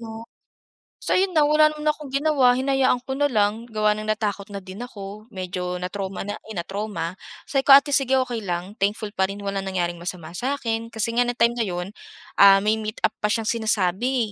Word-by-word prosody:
'no? 225 0 -8 0.8
So - - -2
'yun 375 -2 +1
na 305 - +5
wala 305 +1 +5
naman 305 0 -2
akong 300 -1 -10
ginawa 275 -4 +3
hinayaan 265 -1 +2
ko 265 - -7
na 290 0 +3
lang 215 -1 0
gawa 215 -2 +1
ng 215 0 -3
natakot 210 -2 -2
na 200 - -5
din 190 +2 -10
ako, 215 -2 -8
medyo 180 -1 -4
na-trauma 190 +1 -4
na, 205 +1 -5
eh, 220 - -8
na-trauma, 185 -1 -4 0.3
sabi 270 -1 -1
ko, 275 - +11
"Ate 280 +1 +4
sige 265 -1 +3
okey 240 -2 -4
lang 180 -2 -4
thankful 205 +1 -1
pa 190 -2 +1
rin 200 +1 -7
wala 195 0 -2
nangyaring 175 -3 -2
masama 170 -2 -6
sa 255 +10 -2
akin." 230 -3 -3
Kasi 230 0 -2
nga 245 0 +3
ng 245 - -2
time 235 0 +3
na 225 - +1
'yun, 180 +2 -4 0.5
ah, 195 0 +8
may 215 +1 +1
meetup 215 0 -1
pa 210 - +1
siyang 225 +1 0
sinasabi, 220 +2 0
215 Hz, 205 wpm, -23 LUFS, 195-250 Hz, 0.8 s, ko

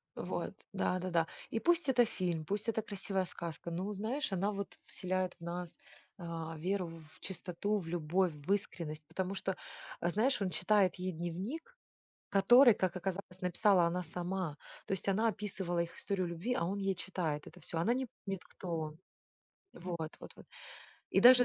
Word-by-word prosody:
вот - - -3 0.2
да-да-да. 180 -3 +1 0.2
И 225 - 0
пусть 340 +1 +3
это 245 -2 +6
фильм, 175 -7 -1
пусть 205 +6 -1
это 225 -1 +1
красивая 195 -2 -2
сказка. 170 -1 -6
Ну, 185 +5 -2
знаешь, 220 +7 -1
она 195 +2 +1
вот 200 -1 -5
вселяет 185 0 -1
в - - -12
нас, 175 0 -4 0.4
а, 165 -2 -4
веру 185 +3 0 0.3
в - - -20
чистоту, 190 +2 -1
в 170 - -7
любовь, 175 +2 +2
в 150 +6 0
искренность, 155 -6 -3
потому 190 +1 -2
что, 190 -1 -1 0.5
э, 170 - +2
знаешь, 230 +5 +2
он 195 - +2
читает 185 +2 +3
ей 185 +1 -2
дневник, 190 - -4 0.5
который, 240 +6 +8
как 185 -2 0
оказалось, 185 0 -4
написала 180 +1 +4
она 180 +2 0
сама. 175 -1 -2 0.3
То - - -5
есть 195 0 -1
она 215 +4 +4
описывала 190 -4 -2
их 170 0 -1
историю 190 -3 -1
любви, 170 +9 -1
а 210 - +1
он 195 +3 -1
ей 195 -1 +1
читает 170 -5 -2
это 180 - -12
всё. 165 - -3
Она 175 +9 +3
не 260 +1 -1 0.2
помнит, 195 -2 -3
кто 175 -3 -4
он. 155 0 -4 0.8
Вот 170 -3 -4
вот - - -9
вот. - - -13 0.6
И - - +5
даже, 250 0 +10
185 Hz, 175 wpm, -35 LUFS, 170-205 Hz, 0.8 s, даже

